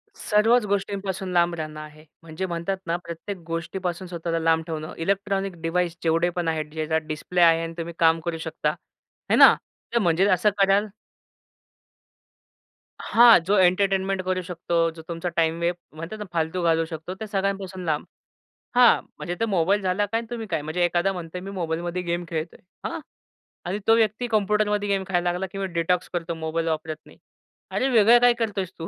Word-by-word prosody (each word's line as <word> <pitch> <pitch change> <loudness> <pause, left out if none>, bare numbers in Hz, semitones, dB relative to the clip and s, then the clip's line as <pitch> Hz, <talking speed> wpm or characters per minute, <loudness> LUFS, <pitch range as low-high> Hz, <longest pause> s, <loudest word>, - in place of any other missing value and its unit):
सर्वच 225 +3 +3
गोष्टींपासून 195 -1 -2
लांब 175 0 +3
राहणं 155 -1 -6
आहे. 155 0 -11 0.2
म्हणजे 165 +3 -5
म्हणतात 170 +2 -3
ना, 170 - +1
प्रत्येक 175 +3 -7
गोष्टीपासून 175 +2 -4
स्वतःला 170 -1 -3
लांब 160 0 +2
ठेवणं. 155 -1 -5
इलेक्ट्रॉनिक 195 +1 -1
डिव्हाइस 170 +1 0
जेवढे 165 +2 +2
पण 175 -2 -1
आहेत, 155 -1 -1
ज्याचा 160 0 0
डिस्प्ले 160 +3 -2
आहे 165 -1 +5
आणि 165 0 -5
तुम्ही 170 0 -5
काम 165 0 +4
करू 170 -1 -2
शकता 160 -2 -2
आहे 150 - -5
ना, - - +9 0.4
तर 235 - +3
म्हणजे 175 -1 +3
असं 185 +3 +4
कराल 195 +2 +3 2.1
हां. 235 -2 +7
जो 200 +3 +2
एंटरटेनमेंट 190 +1 +2
करू 185 0 0
शकतो, 170 -1 -1
जो 160 0 -11
तुमचा 170 +1 -3
टाईम 165 0 +1
वे 170 +1 +1 0.2
म्हणतात 165 +7 -7
ना, 210 - -5
फालतू 165 +2 -1
घालवू 165 -1 +2
शकतो. 160 +2 -7
त्या 220 +3 -7
सगळ्यांपासून 195 -2 -2
लांब. 155 -2 -1 0.7
हां, 245 -1 +6 0.2
म्हणजे 175 -1 -4
ते 230 - +2
मोबाईल 195 0 +1
झाला 190 +2 +1
काय 225 +3 -1
आणि 230 - -8
तुम्ही 230 -2 -5
काय, 165 -5 -1
म्हणजे 160 +4 -1
एखादा 175 +3 +1
म्हणतोय 175 0 -6
मी 195 +2 -7
मोबाईलमध्ये 175 0 -3
गेम 175 0 -2
खेळतोय. 160 0 -4 0.3
हां - - -5 0.7
आणि 190 +4 -2
तो 225 - +7
व्यक्ती 225 +2 +1
कॉम्प्युटरमध्ये 210 -1 +1
गेम 195 -1 +1
खेळायला 175 -2 +1
लागला 180 +2 -3
किंवा 195 -1 -3
डिटॉक्स 175 +2 0
करतो 170 -1 -2
मोबाईल 160 +1 -2
वापरत 155 -1 -2
नाही. - - -17 0.5
अरे, 265 - 0
वेगळं 235 0 +6
काय 245 0 +6
करतोयस 200 -5 -2
तू? 165 - -5
175 Hz, 175 wpm, -24 LUFS, 165-195 Hz, 2.1 s, ना